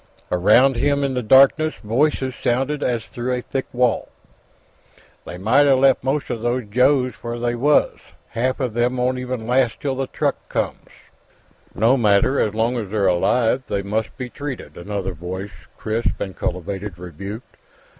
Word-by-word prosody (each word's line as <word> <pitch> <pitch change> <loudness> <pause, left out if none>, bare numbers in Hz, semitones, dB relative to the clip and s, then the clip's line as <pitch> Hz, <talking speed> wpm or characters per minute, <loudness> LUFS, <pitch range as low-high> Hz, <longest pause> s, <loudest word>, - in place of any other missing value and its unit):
Around 115 +9 +4
him, 140 +2 +1
in 135 -1 0
the 125 - -1
darkness, 135 +6 +5
voices 130 +3 0
sounded 135 +5 -1
as 120 -5 -1
through 125 +1 -3
a 125 - -3
thick 135 - -3
wall. 125 -2 +1 1.2
"They 90 - -7
mighta 135 +8 +4
left 130 -1 +3
mosta 135 -2 -1
these 120 0 -2
Joes 130 +2 +3
where 120 0 -4
they 120 0 -1
was. 145 +5 +2 0.3
Half 130 +4 -1
of 125 -5 -2
them 120 +2 0
won't 125 +1 0
even 125 -3 -4
last 125 0 +1
till 140 -2 -2
the 135 0 -3
truck - - -2
comes." - - -3 0.9
"No 115 +5 +3
matter; 110 +4 +3
so 105 - -10
long 115 +2 +1
as 105 -4 -5
they're 105 -1 0
alive, 110 +7 +2
they 100 -1 -2
must 105 +2 -3
be 125 - -4
treated," 140 +1 -7
another 95 +1 -4
voice, 95 +3 -6 0.3
crisp 110 +1 -2
and 95 -2 -5
cultivated, 95 +1 -4
rebuked. 100 - -9
120 Hz, 160 wpm, -21 LUFS, 105-130 Hz, 1.2 s, darkness